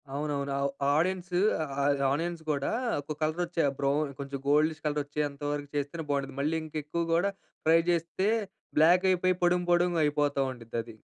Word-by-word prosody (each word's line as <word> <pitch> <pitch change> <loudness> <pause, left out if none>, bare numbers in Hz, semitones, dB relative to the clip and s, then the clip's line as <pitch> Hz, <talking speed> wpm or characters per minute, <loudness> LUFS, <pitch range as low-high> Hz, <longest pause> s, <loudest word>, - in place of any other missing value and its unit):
అవునవును. 140 -1 -2
ఆవ్ 140 0 +1 0.3
ఆడెన్స్ 180 +3 0 0.3
ఆహ్, 145 - -6 0.4
ఆనియన్స్ 165 +3 -2
గూడా, 140 -2 0 0.3
ఒక 150 +2 -6
కలర్ 155 +3 0
వచ్చే, 170 -1 -1 0.2
బ్రౌన్ 140 +1 +1
కొంచెం 140 0 -5
గోల్డిష్ 150 +2 +2
కలర్ 150 -1 +1
వచ్చేంత 145 0 -3
వరకు 145 -1 -4
చేస్తేనే 145 +3 -3
బావుండిద్ది. 135 -1 -2
మళ్ళీ 155 +3 0
ఇంక 155 0 -11
ఎక్కువ 170 +3 -2
గూడా 180 +4 +2 0.3
ఫ్రై 165 +1 +6
జేస్తే 175 +3 +1 0.5
బ్లాక్ 175 +4 +5
అయిపోయి 185 0 +2
పొడుం 175 0 +3
పొడుంగా 175 -1 +3
అయిపోతా 145 -1 +1
ఉండిద్దది. 115 -2 -6
150 Hz, 155 wpm, -29 LUFS, 140-170 Hz, 0.5 s, ఫ్రై